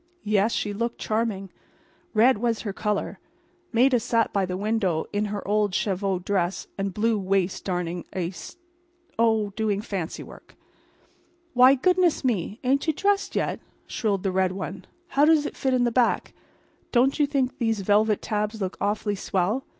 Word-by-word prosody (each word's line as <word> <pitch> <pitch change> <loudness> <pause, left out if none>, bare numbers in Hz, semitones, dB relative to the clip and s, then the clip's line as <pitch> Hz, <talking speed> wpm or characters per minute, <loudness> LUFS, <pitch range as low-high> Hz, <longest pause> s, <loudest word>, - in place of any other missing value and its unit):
Yes, 210 +1 +2
she 205 -2 -2
looked 235 +3 -2
charming. 215 -4 -2 0.6
Red 235 +1 +5
was 230 -1 0
her 205 -4 -4
color. 210 +1 -2 0.5
Maida 250 +2 +4
sat 230 -1 0
by 195 -2 +1
the 180 0 -3
window 200 -6 0
in 205 +1 0
her 205 -1 -5
old 205 -1 +1
cheviot 190 -2 -1
skirt 190 -2 0
and 195 0 -2
blue 215 +3 +1
waist 190 -1 0
darning 175 -2 -3
a 175 -2 -2
st—. 195 - -10 0.6
Oh, 220 -3 +2
doing 215 -3 0
fancy 195 -6 -4
work. - - -15 1.0
"Why, 255 +2 +7
goodness 360 +4 +2
me! 215 -2 -1
ain't 275 +5 +1
you 315 - +3
dressed 400 +5 0
yet?" - - -1 0.3
shrilled 200 -4 -1
the 195 - 0
red 185 0 +1
one. 190 0 -6 0.2
"How 280 - +2
does 305 -1 +5
it - - -5
fit 265 - 0
in 250 - +2
the 240 - +2
back? 240 0 +1 0.6
Don't 265 +4 +3
you 295 - +4
think 270 -3 -1
these 225 -4 0
velvet 210 +2 +2
tabs 210 +1 -2
look 190 -2 -3
awful 205 0 0
swell? 195 +6 -1
210 Hz, 165 wpm, -25 LUFS, 195-240 Hz, 1.0 s, Why